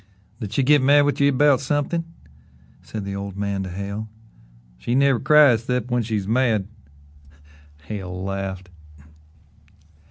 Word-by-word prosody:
"Did 105 -5 -6
she 135 - +1
git 145 +1 +4
mad 145 +2 +5
with 145 0 -1
ye 140 - +5
'bout 140 -1 +3
somethin'?" 145 +4 -1 0.8
said 105 -3 -7
the 100 0 -5
old 100 -1 -6
man 100 -1 -2
to 95 - -5
Hale. 100 +4 -6 0.7
"She 120 - -2
never 135 -2 +3
cries 140 -7 +5
'cept 125 -1 -2
when 120 0 +1
she's 105 -4 -3
mad." 110 -4 +1 1.2
Hale 95 -1 -6
laughed. 95 -1 -5
110 Hz, 135 wpm, -22 LUFS, 100-140 Hz, 1.2 s, mad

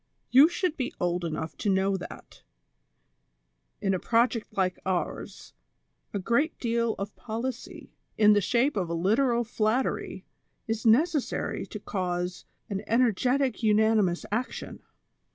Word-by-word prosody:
You 275 +6 +8
should 350 -2 -1
be 255 -3 -3
old 175 0 0
enough 160 -1 -4
to 205 - -1
know 195 0 +2
that, 190 - -9 1.4
in 195 -1 +1
a 185 - 0
project 230 +1 +1
like 185 -1 +1
ours, 185 -2 -4 0.6
a - - -2
great 235 - 0
deal 235 -2 0
of 200 +1 -6
policy, 240 +2 -6 0.2
in 210 -1 +6
the 205 - +3
shape 250 +8 +1
of 185 -5 -1
a 170 - -1
little 235 +7 +2
flattery, 225 +3 -1 0.4
is 225 0 -1
necessary 295 +5 +1
to - - -7
cause 180 -1 -3 0.2
an 195 -1 -3
ener 235 0 +3
getic 255 +5 0
unanimous 215 -4 +3
action. 235 +4 -3
220 Hz, 135 wpm, -27 LUFS, 190-245 Hz, 1.4 s, You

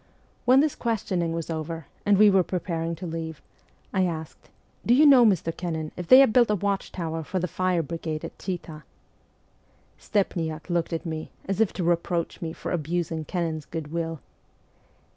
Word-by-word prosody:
When 260 +2 +6
this 305 -1 +1
questioning 190 -7 -1
was 165 0 -3
over, 160 0 -4 0.2
and 205 -1 +5
we 210 0 +7
were 190 -1 +5
pre 180 +1 -2
paring 165 -2 -3
to 180 - -8
leave, 160 -2 -5 0.5
I 190 -2 +3
asked, 160 -2 -7 0.2
' - - -38
Do 240 - +4
J 280 - +5
T - - +8
OU - - +7
know, 265 -4 +8
Mr. 170 -5 +1
Kennan, 160 -3 -4
if 180 -1 -6
they 255 - +9
have 265 -5 +4
built 240 -2 +5
a 210 - +3
watchtower 180 -5 -2
for 185 - -4
the 180 0 0
fire 180 -1 0
brigade 160 0 -4
at - - -10
Chita? 165 -5 -5 0.6
' - - -37
Stepniak 165 -5 -1
looked 170 0 0
at 165 +1 -3
me, 160 -1 -4 0.2
as 195 +2 0
if 220 - +3
to 180 - -3
reproach 170 0 0
me 165 -2 -3
for - - -6
abusing 165 -1 -2
Kennan's 165 -4 -2
good 160 -3 -6
will. 165 -2 -3
170 Hz, 195 wpm, -26 LUFS, 160-190 Hz, 0.6 s, they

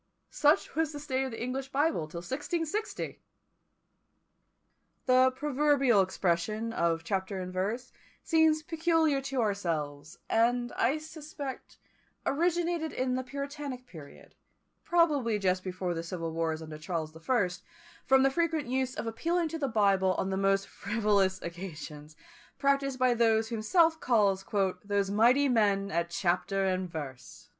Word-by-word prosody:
Such 295 +1 +2
was 320 -1 0
the 290 - -6
state 270 -2 -1
of - - -3
the 225 - -7
English 265 +2 -3
Bible 285 - 0
till 170 +2 -7
1660! 325 - -3 1.9
The 255 0 +5
proverbial 280 -5 +3
expression 190 +4 -1
of 165 -3 0
chapter 190 +2 -2
and 185 0 -6
verse 215 +7 -2 0.3
seems 320 -1 +3
peculiar 320 -3 +1
to 270 -2 -2
ourselves, 160 -8 -2
and, 240 +1 +2
I 260 +6 +1
suspect, 305 -3 -8 0.5
originated 340 +1 0
in 255 0 -1
the 255 - 0
puritanic 280 -1 -6
period, 155 -10 -13 0.5
probably 295 -10 +2
just 185 -2 0
before 185 -1 -3
the 165 - -3
civil 165 -1 -4
wars 160 -1 -2
under 155 -1 -8
Charles 160 -1 -3
the 160 - -13
First, 180 -3 0 0.4
from 265 0 +4
the 270 - +4
frequent 325 -1 0
use 260 +1 -1
of 300 - -4
appealing 330 +9 -1
to 325 +1 -5
the 280 - 0
Bible 195 -5 +2
on 190 - -1
the - - 0
most 195 0 +1
frivolous 200 -3 +1
occasions, 155 -4 -8 0.4
practised 275 -1 +1
by 255 -1 +3
those 225 -1 +2
whom 230 -2 -3
South 325 - +3
calls 205 -7 +2 0.4
"those 200 -1 0
mighty 245 +7 +4
men 200 -5 +2
at 170 0 0
chapter 185 +2 0
and 185 -1 -1
verse." 135 -6 -8
230 Hz, 145 wpm, -30 LUFS, 185-280 Hz, 1.9 s, The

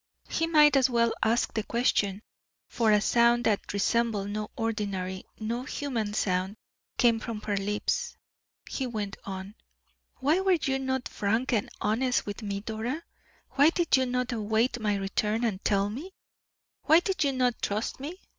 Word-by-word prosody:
He 330 - 0
might 300 -3 +6
as 265 -1 +4
well 235 -1 +2
ask 230 +2 +1
the 220 - 0
question, 210 -3 0 0.4
for 225 -2 +1
a 210 - +5
sound 235 +2 +3
that 210 -4 0
resembled 205 0 0
no 215 0 -3
ordinary, 200 -5 -3
no 230 +2 -2
human 250 -6 -3
sound, 185 0 0 0.4
came 235 -2 +4
from 225 -1 -5
her 205 -1 -2
lips. 210 - -1 0.5
He 265 - -3
went 210 -4 -4
on: 190 +1 -6 0.6
"Why 295 +7 +2
were 380 -2 +3
you 270 -2 0
not 260 -1 -2
frank 225 +6 -1
and 210 -3 0
honest 245 +4 +1
with 205 +3 -6
me, 200 -2 -3
Dora? 230 +9 -4 0.5
why 285 +3 +5
did 340 -2 +2
you 260 -1 +2
not 250 0 -1
await 225 +2 0
my 210 -2 0
return, 210 +3 -1
and 205 -5 -1
tell 200 -1 +2
me? 290 - -7 0.7
why 320 +3 +6
did 370 -4 0
you 280 - +2
not 250 -2 0
trust 210 +5 -2
me? 315 +7 -6
230 Hz, 165 wpm, -28 LUFS, 210-260 Hz, 0.7 s, might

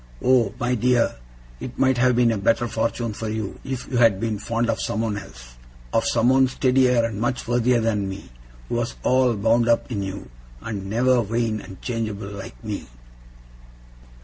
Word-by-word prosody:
Oh, 125 -5 +4
my 125 0 0
dear, 125 0 +2 0.4
it 125 - -7
might 130 -2 +2
have 125 0 +4
been 120 -1 +4
a 110 - 0
better 115 +4 +2
fortune 115 0 -2
for 110 +1 -5
you, 110 -2 -4
if 130 -2 -5
you 125 - -2
had 115 -5 +4
been 110 -2 -2
fond 115 +2 -1
of 115 -1 -1
someone 110 0 -1
else - - -10 0.4
of 115 - +2
someone 130 +3 +4
steadier 125 -2 +3
and 110 -2 -4
much 120 +1 -1
worthier 120 0 +2
than 105 -3 0
me, 95 -9 -8 0.4
who - - -5
was 120 0 -2
all 130 -2 +3
bound 115 +3 +2
up 115 +2 +2
in 105 -4 -2
you, 95 -8 -6 0.3
and 100 - -5
never 125 +3 +3
vain 115 0 -1
and 95 - -12
changeable 110 -4 -3
like 95 -12 -9
me! - - -5
115 Hz, 175 wpm, -23 LUFS, 105-125 Hz, 0.4 s, Oh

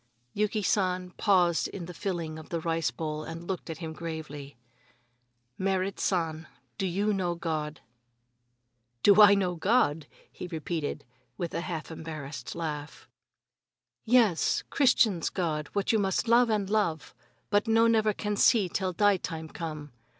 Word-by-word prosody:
Yuki 210 0 0
San 185 -2 0
paused 180 -4 +2
in 180 -4 -7
the 180 - -8
filling 170 -4 -4
of 155 - -12
the 170 - -2
rice 165 -2 0
bowl 155 +4 -4
and 165 +2 -7
looked 185 -2 -4
at 160 - -5
him 160 -1 -6
gravely: 155 -5 -7 1.0
"Merrit 190 0 -1
San, 165 -3 -1 0.3
do 195 - 0
you 200 +4 0
know 180 -3 -1
God?" 155 -2 -3 1.2
"Do 205 +1 +7
I 205 -1 +9
know 185 -3 0
God?" 165 -5 +1 0.2
he 180 - -7
repeated, 160 -2 -4 0.3
with 170 - -4
a - - -1
half 170 -2 -5
embarrassed 150 -6 -7
laugh. 150 -3 -5 1.0
"Yes, 225 -7 +3
Christians' 230 - +3
God, 155 -5 -2
what 200 -1 +1
you 220 - +2
must 195 +3 0
love 235 +1 +5
and 210 -3 0
love, 195 -7 -1 0.4
but 205 +2 +2
no 225 +1 +4
never 220 -2 +3
can 210 0 -3
see 210 -1 +4
till 185 +1 -2
die 205 +1 +4
time 160 -3 -6
come. 155 -4 -6
175 Hz, 150 wpm, -28 LUFS, 160-205 Hz, 1.2 s, I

